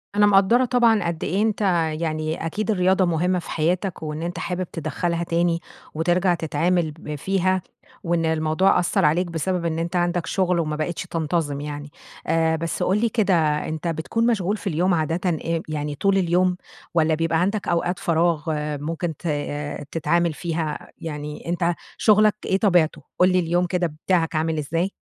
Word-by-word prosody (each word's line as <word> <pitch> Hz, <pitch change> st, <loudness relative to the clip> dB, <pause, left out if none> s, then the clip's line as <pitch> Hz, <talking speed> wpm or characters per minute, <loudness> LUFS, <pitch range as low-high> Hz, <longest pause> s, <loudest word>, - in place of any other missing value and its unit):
أنا 205 Hz, 0 st, +5 dB
مقدرة 205 Hz, +5 st, +5 dB
طبعًا 235 Hz, -4 st, +3 dB
قد 170 Hz, -1 st, -3 dB
إيه 190 Hz, +6 st, 0 dB
أنتَ 215 Hz, -1 st, 0 dB, 0.4 s
يعني 155 Hz, 0 st, -2 dB
أكيد 215 Hz, +7 st, -1 dB
الرياضة 185 Hz, -1 st, +3 dB
مهمة 175 Hz, +2 st, +1 dB
في -, -, -10 dB
حياتَك 175 Hz, +2 st, -1 dB
وإن 155 Hz, 0 st, -4 dB
أنتَ 175 Hz, +1 st, -4 dB
حابب 180 Hz, 0 st, -3 dB
تدخلها 170 Hz, +2 st, -2 dB
تاني 170 Hz, 0 st, +1 dB, 0.3 s
وترجع 175 Hz, +3 st, +2 dB
تتعامل 165 Hz, +1 st, 0 dB
ب 150 Hz, 0 st, -7 dB
فيها، 185 Hz, +4 st, 0 dB, 0.4 s
وإن 170 Hz, -1 st, 0 dB
الموضوع 160 Hz, +4 st, +2 dB
أثَّرعليك 175 Hz, 0 st, +2 dB
بسبب 170 Hz, +2 st, -2 dB
إن 165 Hz, -1 st, -1 dB
أنتَ 170 Hz, +2 st, -3 dB
عندَك 175 Hz, -1 st, +1 dB
شغل 180 Hz, -1 st, +1 dB
وما 155 Hz, -2 st, -1 dB
بقيتش 155 Hz, +3 st, -3 dB
تنتظم 160 Hz, -4 st, -2 dB
يعني. 145 Hz, 0 st, -6 dB, 0.4 s
آآ، 160 Hz, 0 st, +2 dB
بس 165 Hz, 0 st, -2 dB
قل 190 Hz, -, +2 dB
لي 235 Hz, -, +2 dB
كده، 210 Hz, -3 st, +1 dB, 0.3 s
أنتَ 160 Hz, +2 st, -4 dB
بتكون 170 Hz, +8 st, 0 dB
مشغول 205 Hz, -3 st, +1 dB
في -, -, -7 dB
اليوم 180 Hz, +2 st, +1 dB
عادةً 165 Hz, +3 st, 0 dB
إم 165 Hz, 0 st, -1 dB
يعني 150 Hz, -1 st, -3 dB
طول 195 Hz, +6 st, +2 dB
اليوم 180 Hz, 0 st, +2 dB, 0.4 s
والّا 160 Hz, -1 st, +3 dB
بيبقى 165 Hz, 0 st, +1 dB
عندَك 200 Hz, +3 st, -1 dB
أوقات 175 Hz, +1 st, 0 dB
فراغ 165 Hz, -2 st, +1 dB, 0.4 s
ممكن 165 Hz, +1 st, -3 dB
ت -, -, -5 dB, 0.6 s
تتعامل 170 Hz, +1 st, +1 dB
فيها؟ 160 Hz, -2 st, -4 dB
يعني 150 Hz, -1 st, -6 dB
أنتَ 175 Hz, 0 st, +1 dB, 0.2 s
شغلَك 215 Hz, 0 st, +4 dB
إيه 190 Hz, -, +2 dB
طبيعته؟ 180 Hz, -6 st, +2 dB, 0.2 s
قل 185 Hz, +1 st, +5 dB
لي، 185 Hz, -, +3 dB
اليوم 175 Hz, +1 st, +1 dB
كده 180 Hz, 0 st, 0 dB, 0.2 s
بتاعَك 170 Hz, -3 st, +1 dB
عامل 160 Hz, +1 st, 0 dB
إزاي. 165 Hz, +6 st, -1 dB
170 Hz, 165 wpm, -23 LUFS, 160-185 Hz, 0.6 s, أنا